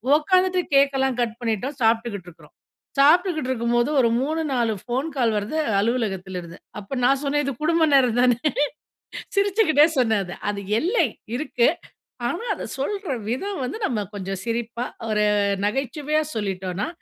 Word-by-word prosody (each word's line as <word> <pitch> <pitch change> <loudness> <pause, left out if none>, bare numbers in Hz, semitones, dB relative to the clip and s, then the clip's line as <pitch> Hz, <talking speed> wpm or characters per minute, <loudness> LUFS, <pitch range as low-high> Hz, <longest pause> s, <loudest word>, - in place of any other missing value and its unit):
உக்காந்துட்டு 370 +4 +2 0.2
கேக்கல்லாம் 270 -2 +3
கட் 230 -2 0
பண்ணிட்டோம். 235 +4 -2
சாப்பிட்டுக்கிட்டு 225 -4 +1
இருக்கிறோம். 175 - -18 0.5
சாப்பிட்டுக்கிட்டு 310 -1 +4
இருக்கும்போது 240 +1 +1
ஒரு 235 -2 +4
3, 315 +4 -1
4 235 -3 +1
ஃபோன் 260 +6 -2
கால் 235 -5 +2
வருது, 210 +10 -3 0.2
அலுவலகத்திலிருந்து. 190 -6 -2 0.2
அப்போ 200 +5 -9
நான் 270 +3 +3
சொன்னேன், 290 +1 +1
"இது 275 - -1
குடும்ப 325 0 +3
நேரந்தானே!" 245 -2 +4 1.0
சிரிச்சுக்கிட்டே 390 -7 +4
சொன்னேன் 220 -5 +2
அத. 175 - -7 0.2
அது 200 -1 -5 0.2
எல்லை 370 - +2 0.3
இருக்கு. 250 -5 +1 0.6
ஆனா 345 - -3
அதை - - -6
சொல்ற 390 +3 -2 0.2
விதம் 380 - -3
வந்து, 250 - -4
நம்ம 215 -4 -1
கொஞ்சம் 195 -1 -4
சிரிப்பா, 235 +1 -3 0.2
ஒரு 210 0 +2 0.4
நகைச்சுவையா 290 +6 -1
சொல்லிட்டோனா, 190 - -3
250 Hz, 135 wpm, -23 LUFS, 220-300 Hz, 1.0 s, சாப்பிட்டுக்கிட்டு